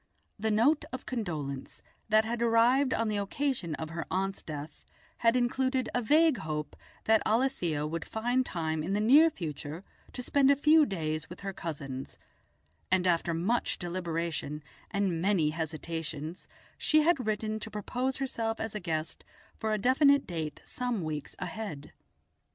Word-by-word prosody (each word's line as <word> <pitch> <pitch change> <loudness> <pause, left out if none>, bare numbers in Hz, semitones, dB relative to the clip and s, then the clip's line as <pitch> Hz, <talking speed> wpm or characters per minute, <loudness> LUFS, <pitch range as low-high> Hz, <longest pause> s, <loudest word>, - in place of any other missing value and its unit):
The 220 +2 0
note 245 +9 +3
of 255 - -6
condolence 155 - -4 0.3
that 220 0 +5
had 235 +1 -2
arrived 240 +4 +4
on 230 -2 +1
the 210 -1 0
occasion 200 - -1
of 160 +1 -6
her 165 0 -4
aunt's 195 +1 -1
death 150 -1 -7 0.3
had 230 +1 +3
included 255 +1 +1
a 245 - +1
vague 305 +4 +4
hope 150 -3 -4 0.3
that 220 0 +4
Alethia 215 - +1
would 165 +1 -3
find 245 +4 0
time 160 -7 -2
in 175 +5 -2
the 205 - +1
near 280 +10 +7
future 160 - -6 0.3
to 250 - -5
spend 275 +1 +3
a 280 - +6
few 300 +2 +5
days 155 -5 -3
with 175 - -10
her 195 -1 -4
cousins, 140 -6 -6 0.7
and 185 -1 +3
after 170 -1 +2
much 210 +9 0
deliberation 170 -4 -3 0.3
and 195 -5 0
many 180 -5 +2
hesitations 160 0 -4 0.3
she 310 0 +4
had 305 -8 +2
written 215 0 -1
to 215 - -7
propose 250 +5 -2
herself 230 -4 -2
as 220 -1 -3
a 210 - -3
guest 160 -3 -3 0.3
for 220 - -2
a 215 - +2
definite 275 +5 +4
date 160 -4 -4
some 245 -6 -2
weeks 150 -2 -4
ahead. 185 -11 -6
205 Hz, 155 wpm, -30 LUFS, 160-245 Hz, 0.7 s, near